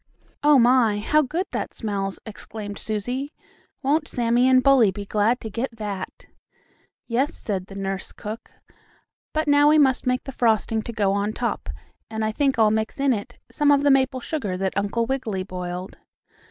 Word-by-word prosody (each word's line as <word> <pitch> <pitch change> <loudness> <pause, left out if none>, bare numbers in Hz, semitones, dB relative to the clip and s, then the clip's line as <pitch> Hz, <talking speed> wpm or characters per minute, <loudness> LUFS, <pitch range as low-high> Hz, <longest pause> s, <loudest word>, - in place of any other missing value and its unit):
"Oh, 295 -1 +6
my! 240 -3 +4
How 300 +9 +2
good 320 +7 -2
that - - -4
smells!" 195 -3 -3
exclaimed 210 -1 -7
Susie. 245 +7 -3 0.5
"Won't 300 +3 +1
Sammie 240 +1 +2
and 255 -1 +5
Bully 265 -6 +6
be 200 +2 -6
glad 215 +5 +1
to 220 - -5
get 230 +2 -4
that?" 200 -3 -6 0.8
"Yes," 260 +6 0
said 190 -3 -4
the 195 - -11
nurse 195 -1 -4
cook, 215 +3 -8 0.8
"but 310 0 -1
now 290 0 +5
we 310 - +5
must 265 -4 +3
make 250 0 +1
the 270 - -7
frosting 225 -2 +1
to 235 - -6
go 205 -4 +1
on 200 +2 -1
top, 230 - -3 0.4
and 220 0 -2
I 215 - 0
think 270 +3 +1
I'll 220 -2 +4
mix 220 +4 -2
in 275 -1 +3
it 205 -3 -6
some 295 -1 +2
of 285 -1 +4
the 285 - +5
maple 265 -1 +2
sugar 215 -11 -3
that 190 0 -2
Uncle 215 +3 0
Wiggily 225 -7 -2
boiled." 180 0 -6
230 Hz, 180 wpm, -23 LUFS, 205-270 Hz, 0.8 s, Oh